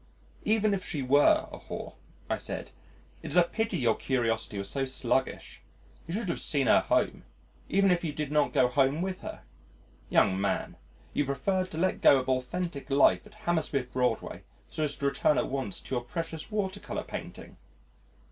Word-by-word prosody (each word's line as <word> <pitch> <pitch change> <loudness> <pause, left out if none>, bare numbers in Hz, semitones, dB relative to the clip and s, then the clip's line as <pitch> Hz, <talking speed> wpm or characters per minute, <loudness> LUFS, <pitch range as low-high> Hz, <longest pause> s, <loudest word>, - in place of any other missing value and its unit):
"Even 215 -1 +3
if 190 -2 -2
she 145 -5 -3
were 140 +3 +5
a - - -8
whore," - - -7 0.3
I - - 0
said, - - -5 0.5
"it's 145 - -4
a 175 - +7
pity 215 +2 -1
your 120 -6 +3
curiosity 115 -5 -1
was 100 0 -3
so 135 +6 -1
sluggish. 130 0 -2 0.5
You 165 - -3
should 210 -4 -2
have 170 - -1
seen 140 -3 +1
her - - +6
home, - - 0 0.5
even 195 0 +4
if 175 -1 +1
you 160 - -1
did 150 -1 -4
not 150 -1 +2
go 125 - +4
home 135 +5 +2
with 190 -1 -4
her. - - -8 0.7
Young 95 -1 +3
man, 100 - -1 0.4
you 145 - +2
preferred 185 +8 -1
to 160 - -7
let 185 +3 0
go 140 - +7
of 130 0 -2
authentic 140 +4 -2
life 95 -10 +4
at - - -18
Hammersmith 150 -7 0
Broadway, 125 -3 -1 0.3
so - - -4
as 145 -2 0
to 140 - -4
return 140 +2 +2
at - - 0
once 130 -7 -3
to - - -7
your 120 -1 0
precious 165 +4 -5
water 200 -2 -2
colour - - -5
painting." - - -8
145 Hz, 185 wpm, -29 LUFS, 130-180 Hz, 0.7 s, a